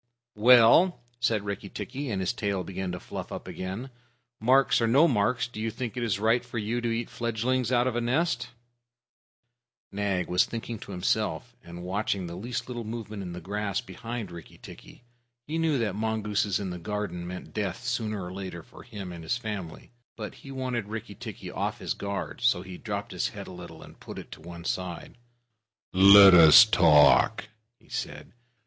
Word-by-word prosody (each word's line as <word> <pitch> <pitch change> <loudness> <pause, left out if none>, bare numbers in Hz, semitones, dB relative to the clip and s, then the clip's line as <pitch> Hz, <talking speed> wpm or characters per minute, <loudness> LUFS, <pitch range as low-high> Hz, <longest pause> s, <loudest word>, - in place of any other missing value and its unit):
"Well," 125 - +6 0.2
said 115 -4 0
Rikki 100 -1 -5
tikki, 130 +9 -5
and 100 -4 -2
his 95 - 0
tail 100 -5 -2
began 95 0 -4
to 90 - -5
fluff - - -7
up - - -7
again, 100 +8 -6 0.5
"marks 130 +3 +4
or 115 - +2
no 140 +9 +5
marks, 120 -2 +1
do 115 -3 -8
you 115 - -1
think 120 +2 -5
it 125 - -3
is 115 -5 0
right 115 +3 +2
for 120 -1 -7
you 115 +3 -2
to 120 - -1
eat 115 +1 -2
fledglings 120 +2 -1
out 120 -1 +3
of 130 -2 -1
a 120 - 0
nest?" 125 +1 0 1.4
Nag 100 -3 -1
was 90 +1 +3
thinking 115 -1 -6
to 115 - -10
himself, 90 -2 -1
and 85 +1 -9
watching 95 0 -2
the 85 - -7
least 115 +7 -5
little 120 -2 -5
movement 110 -2 -6
in 90 -2 -6
the 90 - -6
grass 100 +3 -2
behind 115 +1 -6
Rikki 85 -2 -11
tikki. - - -13 0.4
He 160 +2 -3
knew 160 -3 +2
that 110 -5 -1
mongooses 105 -1 -1
in 95 -3 -4
the 90 - -6
garden 90 -2 -4
meant 90 +1 -8
death 105 +2 -3
sooner 110 -4 -2
or 90 +1 -7
later 95 -3 -7
for - - -15
him 100 -6 -8
and 85 -1 -8
his 100 +10 -1
family, 105 -8 -7 0.2
but 105 -2 -6
he 140 - -14
wanted 130 -2 -3
to 105 - -15
get - - -11
Rikki 115 - -6
tikki - - -8
off - - -2
his - - -3
guard. 100 0 -5
So 100 -7 +2
he 95 -1 -9
dropped 105 -2 -4
his - - -1
head - - -8
a - - -10
little, - - -10
and - - -15
put - - -9
it - - -9
on - - -18
one 85 +1 -10
side. 90 +6 -4 0.7
"Let 100 +1 +9
us 85 +5 +10
talk," 90 +4 +5 0.3
he - - -25
said. - - -6
105 Hz, 195 wpm, -27 LUFS, 95-120 Hz, 1.4 s, us